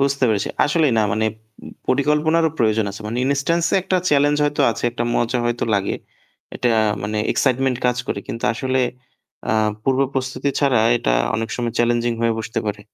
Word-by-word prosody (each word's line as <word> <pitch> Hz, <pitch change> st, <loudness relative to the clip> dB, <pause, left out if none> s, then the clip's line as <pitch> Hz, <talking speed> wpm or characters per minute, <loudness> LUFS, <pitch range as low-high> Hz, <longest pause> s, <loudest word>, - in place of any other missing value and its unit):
বুঝতে 140 Hz, -1 st, +1 dB
পেরেছি। 105 Hz, -3 st, 0 dB, 0.2 s
আসলেই 150 Hz, -2 st, +2 dB
না -, -, +4 dB
মানে 110 Hz, +2 st, 0 dB, 0.4 s
উম -, -, -9 dB, 0.2 s
পরিকল্পনারও 150 Hz, +4 st, +2 dB
প্রয়োজন 110 Hz, -1 st, +2 dB
আছে। 100 Hz, -, -9 dB
মানে 115 Hz, +3 st, -3 dB
ইনস্টান্স 140 Hz, +5 st, +1 dB
এ -, -, +4 dB
একটা 185 Hz, -, 0 dB
চ্যালেঞ্জ 145 Hz, 0 st, +3 dB
হয়তো 145 Hz, 0 st, -1 dB
আছে, 115 Hz, -, -5 dB
একটা 120 Hz, 0 st, -3 dB
মজা 120 Hz, +1 st, 0 dB
হয়তো 120 Hz, 0 st, -1 dB
লাগে। 100 Hz, -1 st, 0 dB, 0.6 s
এটা 125 Hz, -, 0 dB, 0.3 s
মানে 105 Hz, +1 st, -2 dB
এক্সাইটমেন্ট 130 Hz, -1 st, +1 dB
কাজ 125 Hz, -, +1 dB
করে। -, -, -2 dB
কিন্তু 115 Hz, -, -5 dB
আসলে 130 Hz, +2 st, -1 dB, 0.7 s
আ -, -, +2 dB, 0.3 s
পূর্ব 135 Hz, +2 st, +1 dB
প্রস্তুতি 130 Hz, +1 st, -2 dB
ছাড়া 135 Hz, -4 st, +3 dB, 0.2 s
এটা -, -, -1 dB, 0.2 s
অনেক 115 Hz, 0 st, -2 dB
সময় 120 Hz, -2 st, -2 dB
চ্যালেঞ্জিং 120 Hz, 0 st, +2 dB
হয়ে 115 Hz, 0 st, +2 dB
বসতে 115 Hz, 0 st, -3 dB
পারে। 105 Hz, 0 st, -3 dB
125 Hz, 175 wpm, -20 LUFS, 115-140 Hz, 0.7 s, না